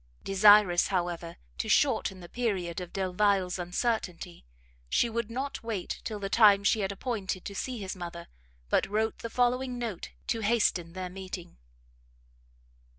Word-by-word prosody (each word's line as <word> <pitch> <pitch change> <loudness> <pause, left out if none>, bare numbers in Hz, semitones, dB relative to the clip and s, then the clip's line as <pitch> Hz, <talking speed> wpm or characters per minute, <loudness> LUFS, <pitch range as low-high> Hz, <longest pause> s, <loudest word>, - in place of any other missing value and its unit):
Desirous, 195 -2 +6
however, 175 -3 -2 0.2
to - - -2
shorten 185 -1 +2
the 175 - -9
period 190 -7 -2
of 180 - -7
Delvile's 190 -1 +1
uncertainty, 180 - -3 0.4
she 235 - +2
would 235 -1 -2
not 265 +4 -4
wait 220 -5 -4
till 215 - -4
the 200 -1 -4
time 200 -1 +6
she 215 - +3
had 195 -1 -1
appointed 200 -3 -3
to 200 - -5
see 250 +5 -4
his 195 -3 -5
mother, 170 -1 -7 0.4
but - - +2
wrote 220 +2 0
the 230 - -5
following 250 +1 +1
note 230 -7 -4 0.2
to 230 - -1
hasten 205 -6 +1
their 185 -1 -5
meeting. 185 - -8
195 Hz, 150 wpm, -29 LUFS, 180-225 Hz, 0.4 s, Desirous